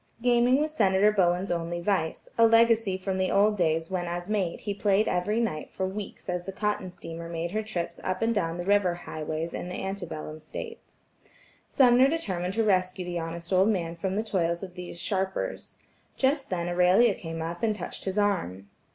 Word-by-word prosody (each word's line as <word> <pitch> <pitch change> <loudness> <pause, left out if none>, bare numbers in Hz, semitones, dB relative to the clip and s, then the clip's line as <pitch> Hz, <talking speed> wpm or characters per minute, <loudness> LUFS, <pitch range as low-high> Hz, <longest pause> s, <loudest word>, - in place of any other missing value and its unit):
Gaming 245 +2 +4
was 305 +1 -1
Senator 200 -3 +4
Bowen's 185 -1 +1
only 170 0 -2
vice, 175 -3 -1
a 230 0 +6
legacy 230 -3 +4
from 190 0 -3
the 185 - +1
old 210 +1 +4
days 165 -2 0
when 180 -2 -2
as 175 +1 -4
mate 190 -5 -1
he 205 - -2
played 205 +1 +2
every 185 +5 0
night 175 -10 -2
for 190 - -3
weeks 200 +1 -7
as 180 -1 -2
the 195 - -4
cotton 210 -1 -2
steamer 165 -1 -8
made 170 0 -3
her 215 +2 -1
trips 175 -6 -4
up 185 +3 -1
and 230 +1 +2
down 170 -5 -1
the 175 - -3
river 200 -3 +3
highways 160 -1 -5
in 180 - -5
the 180 - -5
ante 195 0 -4
bellum 155 0 -7
days. 465 -2 -8 0.7
Sumner 255 0 +6
determined 190 - -2
to 225 - +2
rescue 185 -3 +1
the 175 -1 -3
honest 170 +2 -5
old 190 +3 +5
man 170 -6 -1
from 185 +3 -3
the 215 - 0
toils 170 -5 -1
of 185 -2 -7
these 180 -1 -8
sharpers. 190 0 -2 0.4
Just 275 +1 +1
then 175 -2 -2
Aurelia 180 +6 +4
came 165 -3 -6
up 170 +1 -4
to 230 - 0
him - - +2
and 215 - 0
touched 180 - -6
his 190 +1 -2
arm. 100 - -1
185 Hz, 205 wpm, -27 LUFS, 175-210 Hz, 0.7 s, a